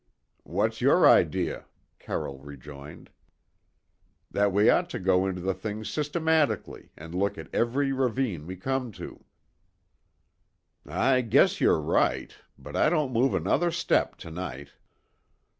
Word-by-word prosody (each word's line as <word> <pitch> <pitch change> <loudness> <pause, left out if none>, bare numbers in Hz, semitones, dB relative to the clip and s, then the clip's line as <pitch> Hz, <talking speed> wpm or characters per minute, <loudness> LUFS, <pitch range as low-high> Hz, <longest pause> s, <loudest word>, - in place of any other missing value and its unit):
"What's - - -1
your - - +5
idea?" - - +2 0.3
Carroll 70 -1 -5
rejoined. 70 +3 -12 1.2
"That 100 0 +2
we 105 +3 +3
ought 175 0 +3
to - - -5
go 95 0 +2
into 90 -2 -4
the 95 +2 -1
thing 110 +2 -6
systematically 155 - -1
and 80 +2 -10
look 100 +3 -1
at 80 - -10
every 135 +4 +1
ravine 125 - -1
we 95 - -6
come 130 +5 -3
to." - - -10 1.6
"I 130 -1 +2
guess 115 -4 +3
you're - - +4
right, 75 - 0 0.2
but - - -10
I - - +3
don't 150 -6 0
move 125 +4 +2
another 175 0 +1
step 170 0 0
to 80 - -8
night." 70 -5 -6
105 Hz, 130 wpm, -27 LUFS, 85-135 Hz, 1.6 s, your